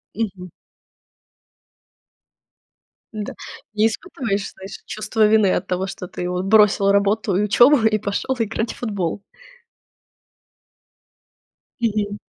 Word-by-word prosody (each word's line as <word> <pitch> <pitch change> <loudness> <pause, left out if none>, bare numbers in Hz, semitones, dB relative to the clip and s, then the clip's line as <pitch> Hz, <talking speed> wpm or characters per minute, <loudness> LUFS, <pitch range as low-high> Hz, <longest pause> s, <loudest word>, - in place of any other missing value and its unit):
Мгм. 195 -4 -4 2.6
Да, 210 -1 -5 0.4
не 215 +1 +3
испытываешь, 225 - -3
знаешь, 190 +1 -10
чувства 215 +1 0
вины 210 -2 +4
от 185 - -1
того, 185 +1 -1
что 195 -2 -7
ты 180 0 -5
вот 180 +1 -2
бросил 205 -1 +4
работу 200 +1 +1
и 200 - +2
учёбу 240 +7 +5
и 215 -1 +3
пошёл 210 +5 -2
играть 225 0 -2
в - - -16
футбол? 200 -6 -3 2.6
Мгм. 210 -2 -1
205 Hz, 105 wpm, -21 LUFS, 195-220 Hz, 2.6 s, учёбу